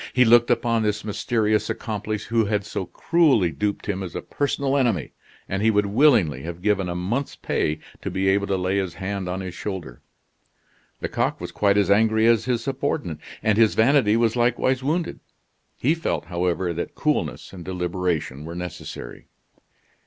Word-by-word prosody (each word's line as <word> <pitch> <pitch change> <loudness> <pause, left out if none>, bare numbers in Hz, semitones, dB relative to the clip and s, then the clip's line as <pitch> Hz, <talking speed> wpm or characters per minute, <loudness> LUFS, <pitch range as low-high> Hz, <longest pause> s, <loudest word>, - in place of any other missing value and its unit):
He 125 0 +5
looked 120 +1 +6
upon 115 -1 +2
this 105 -1 -1
mysterious 110 0 0
accomplice 110 -2 -3
who 115 0 +1
had 105 -1 -1
so 95 -4 -4
cruelly 145 - +3
duped 100 +8 -2
him 100 -2 -2
as 90 -3 -6
a - - -4
personal 140 -1 -1
enemy, 120 - +1 0.4
and 95 +1 -2
he 110 - +4
would 105 -1 +3
willingly 100 - +3
have 85 +3 -7
given 100 -3 +1
a 85 - -3
month's 115 +11 -2
pay 75 0 -1 0.2
to - - -3
be 95 +1 -1
able 100 +1 +2
to 95 - 0
lay 90 +2 0
his 95 -3 -2
hand 95 -1 -4
on 95 +2 -3
his 95 -2 -6
shoulder. 90 -12 -6 1.0
Lecoq - - -1
was - - -6
quite 100 -1 +2
as 100 -1 +3
angry 110 +1 +4
as 115 -1 +4
his 120 -2 0
subordinate, 135 - -2 0.2
and 110 0 +2
his 110 -2 +4
vanity 115 -2 +4
was 115 -1 +2
likewise 125 +2 +1
wounded; 160 +6 -1 0.6
he 145 +6 +2
felt, 165 0 -2
however, 90 0 -1
that 85 - -5
coolness - - -1
and 90 -3 -8
deliberation 90 -5 -2
were 85 +2 -7
necessary. 90 -8 -7
105 Hz, 175 wpm, -23 LUFS, 90-115 Hz, 1.0 s, looked